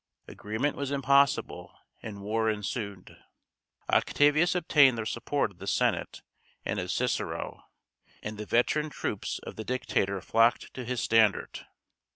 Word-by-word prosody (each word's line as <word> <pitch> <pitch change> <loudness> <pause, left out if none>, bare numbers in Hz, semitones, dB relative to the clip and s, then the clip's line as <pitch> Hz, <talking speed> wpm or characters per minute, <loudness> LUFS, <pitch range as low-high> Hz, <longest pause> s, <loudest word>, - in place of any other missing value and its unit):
Agreement 110 +8 -3
was 140 -1 -3
impossible, 140 0 +1 0.2
and 100 -2 -8
war 110 +2 0
ensued. 105 -2 -4 0.7
Octavius 155 +5 +3
obtained 145 -7 +5
the 115 - -3
support 120 +1 -1
of 90 - -22
the - - -8
Senate - - 0 0.4
and 105 - -1
of 90 0 -4
Cicero; 125 -1 -2 0.6
and 105 0 -5
the 105 - -6
veteran 150 +7 +1
troops - - -3
of - - -9
the 110 - -4
dictator 100 -5 -1
flocked 115 +5 +2
to 125 - -6
his 125 -1 -2
standard. 110 -3 +2
115 Hz, 135 wpm, -28 LUFS, 105-140 Hz, 0.7 s, obtained